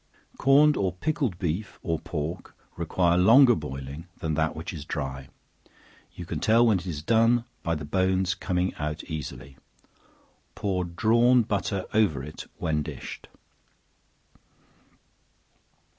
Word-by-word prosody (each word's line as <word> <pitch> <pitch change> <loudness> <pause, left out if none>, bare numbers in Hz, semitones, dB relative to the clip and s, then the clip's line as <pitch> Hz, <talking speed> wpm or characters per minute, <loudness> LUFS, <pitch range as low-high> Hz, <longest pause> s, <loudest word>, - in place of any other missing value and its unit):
Corned 145 +2 +5
or 95 -2 0
pickled 125 - -1
beef, 90 +2 -3
or 80 -1 -1
pork, 80 +1 -5 0.2
require 90 -1 +1
longer 120 +7 +7
boiling 70 - -6
than 80 -1 -2
that 80 +1 0
which 80 +4 -6
is 75 -4 -6
dry; 65 -4 -5 0.9
you 90 - -7
can 80 -2 -4
tell 115 +7 +4
when 110 -5 +3
it 85 - -9
is 75 -4 -4
done 115 +3 +3 0.2
by 85 -2 -1
the 75 -1 -6
bones 95 +2 +1
coming 90 +1 -1
out 75 +1 -3
easily. 70 -3 -7 1.0
Pour 95 -3 -1
drawn 115 +7 +3
butter 100 -2 -2
over 95 - +2
it 75 +2 -9
when 80 -2 -1
dished. - - -8
90 Hz, 130 wpm, -26 LUFS, 75-110 Hz, 1.0 s, longer